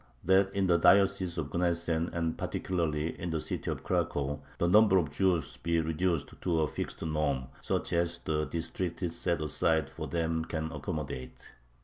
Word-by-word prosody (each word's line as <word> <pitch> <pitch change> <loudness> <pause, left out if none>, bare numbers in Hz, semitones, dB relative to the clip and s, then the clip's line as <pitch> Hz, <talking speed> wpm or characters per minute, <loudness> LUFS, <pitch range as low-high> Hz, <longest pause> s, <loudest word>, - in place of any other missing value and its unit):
That 95 +1 +4
in 100 -1 +2
the 85 -2 +4
diocese 95 -1 +4
of 75 -4 -3
Gnesen 85 -1 0
and 85 -1 -1
particularly 80 -4 -1
in 85 - -3
the 80 -1 -1
city - - -3
of - - -3
Cracow 70 +1 -1 0.2
the 85 - +1
number 105 +1 +6
of 80 -6 +1
Jews 90 +1 +1
be 85 0 0
reduced 80 -1 0
to 85 -3 +1
a 75 - +2
fixed - - -5
norm, 70 -5 -1
such - - -1
as 85 0 +1
the 75 -2 -1
district 85 +2 -3
set 85 -1 -1
aside 75 -1 +1
for - - -6
them 80 -1 0
can 80 -1 -3
accommodate. 75 -4 -5
85 Hz, 165 wpm, -30 LUFS, 75-90 Hz, 0.2 s, number